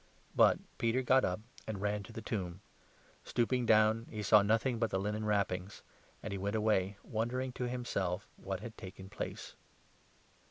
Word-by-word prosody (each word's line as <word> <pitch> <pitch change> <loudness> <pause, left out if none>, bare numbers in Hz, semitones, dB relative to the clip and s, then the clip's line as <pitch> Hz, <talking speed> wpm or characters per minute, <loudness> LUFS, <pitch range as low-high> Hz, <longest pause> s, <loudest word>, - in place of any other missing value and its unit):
[But - - +6 0.2
Peter 115 +3 +2
got 130 +1 +5
up 90 +3 0 0.3
and 110 -3 -3
ran 105 +1 0
to 110 - -11
the 115 -1 -7
tomb. 95 -4 -3 0.6
Stooping 120 0 +1
down 110 +1 +4
he - - -11
12 - - -4
saw 105 +2 +7
nothing 115 +4 +2
but 115 -1 +1
the - - 0
linen 105 +2 -2
wrappings, 100 -2 -1 0.4
and 110 - -4
he 100 - -3
went 100 +3 -1
away, 105 -3 +2
wondering 125 +4 -1
to 125 - -3
himself 100 -7 -2
at - - -19
what 95 -1 -2
had 115 0 -7
taken 95 0 -9
place. - - -6
105 Hz, 175 wpm, -34 LUFS, 100-115 Hz, 0.6 s, saw